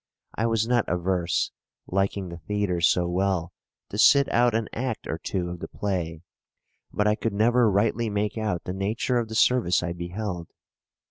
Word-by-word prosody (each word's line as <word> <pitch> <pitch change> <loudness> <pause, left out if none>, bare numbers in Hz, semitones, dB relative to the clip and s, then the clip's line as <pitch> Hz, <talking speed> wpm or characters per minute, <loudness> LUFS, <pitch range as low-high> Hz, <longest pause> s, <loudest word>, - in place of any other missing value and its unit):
I 115 - 0
was 115 -1 +1
not 120 -2 +2
averse, 90 0 0 0.3
liking 95 0 -1
the 85 0 -8
theatre 100 -2 -1
so 85 +1 +3
well, 90 -1 0 0.4
to - - -5
sit 140 -1 +6
out 120 -1 +3
an 115 -1 0
act 120 -2 -3
or 80 - -4
two 90 -1 -3
of 90 - -7
the - - -6
play, 85 -5 -3 0.7
but 105 - 0
I 105 - +4
could 110 0 -2
never 115 +3 +4
rightly 110 +3 +1
make 105 0 -1
out 105 -6 -2
the 90 - -4
nature 110 +6 0
of 115 - -2
the 110 - -5
service 110 -6 +3
I 85 -1 -2
beheld. 90 0 -5
100 Hz, 180 wpm, -26 LUFS, 90-115 Hz, 0.7 s, sit